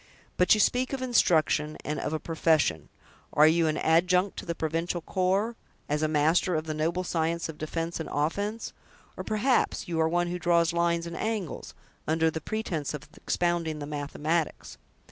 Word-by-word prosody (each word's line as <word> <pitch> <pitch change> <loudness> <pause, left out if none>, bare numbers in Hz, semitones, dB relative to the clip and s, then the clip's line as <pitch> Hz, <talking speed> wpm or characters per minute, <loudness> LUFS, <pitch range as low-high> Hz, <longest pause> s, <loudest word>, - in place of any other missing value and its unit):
"But 180 +4 +5
you - - -1
speak 250 +5 +2
of 265 -1 -2
instruction, 160 -10 +2
and 150 0 -2
of 150 - -3
a 155 - -1
profession; 160 - +1 0.4
are 150 - +6
you 160 +1 +4
an 155 0 0
adjunct 180 +4 +2
to - - -9
the 170 - -2
provincial 165 +2 -2
corps, 195 +7 0 0.3
as 150 +1 -1
a 155 - +2
master 160 +4 +2
of 155 - 0
the 155 - -3
noble 165 +4 -1
science 170 -1 -1
of 160 -2 -9
defense 165 +2 -3
and 160 - -5
offense; 200 +10 -2 0.4
or, - - -5
perhaps, 215 0 +1
you 165 -2 -2
are 160 - +2
one 175 +1 +1
who 180 +1 -3
draws 170 -1 +2
lines 170 0 +1
and 170 0 -6
angles, 215 -7 -4 0.3
under 160 +1 +2
the 160 - -5
pretense 165 -8 -3
of 150 0 -9
expounding 170 -3 -1
the 145 - -5
mathematics?" 150 +2 -3
165 Hz, 180 wpm, -28 LUFS, 155-180 Hz, 0.4 s, are